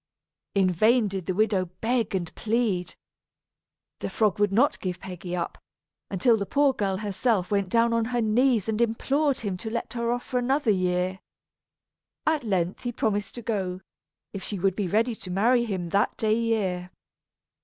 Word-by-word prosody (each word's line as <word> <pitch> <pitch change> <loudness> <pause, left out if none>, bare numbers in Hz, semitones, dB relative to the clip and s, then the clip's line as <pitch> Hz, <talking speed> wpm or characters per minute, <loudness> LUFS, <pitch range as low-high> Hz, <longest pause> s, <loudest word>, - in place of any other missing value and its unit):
In 190 -2 +4
vain 220 +6 +4
did 190 -3 -5
the 185 - -1
widow 205 -3 +2
beg 230 -3 0
and 175 -3 -3
plead. 215 -5 -1 1.0
The - - -3
frog 210 -3 +1
would 205 -1 +3
not 245 +9 +3
give 180 -1 -4
Peggy 180 -1 -6
up, 170 -1 -4 0.5
until 225 +4 +3
the 200 -2 -3
poor 285 -1 +3
girl 195 -5 -1
herself 205 -1 0
went 200 -2 +1
down 230 +2 +3
on 230 -1 +2
her 245 +1 -1
knees 230 -1 +2
and 220 +1 0
implored 270 +5 +1
him 200 -4 -3
to 220 +4 -6
let 235 +1 -4
her 235 -1 -1
off 245 0 -1
for 250 - -1
another 265 -1 +2
year. 185 0 0 1.1
At 310 -3 +1
length 185 -5 -1
he 245 - -2
promised 205 -3 -1
to 240 - -7
go, 190 -5 -2 0.5
if 195 - -5
she 205 - -4
would 190 0 +1
be 200 -2 -1
ready 225 +6 +2
to 200 - -9
marry 235 +6 +3
him 185 -6 -3
that 200 +4 +1
day 215 -1 +2
year. 205 -6 -1
210 Hz, 175 wpm, -26 LUFS, 185-235 Hz, 1.1 s, In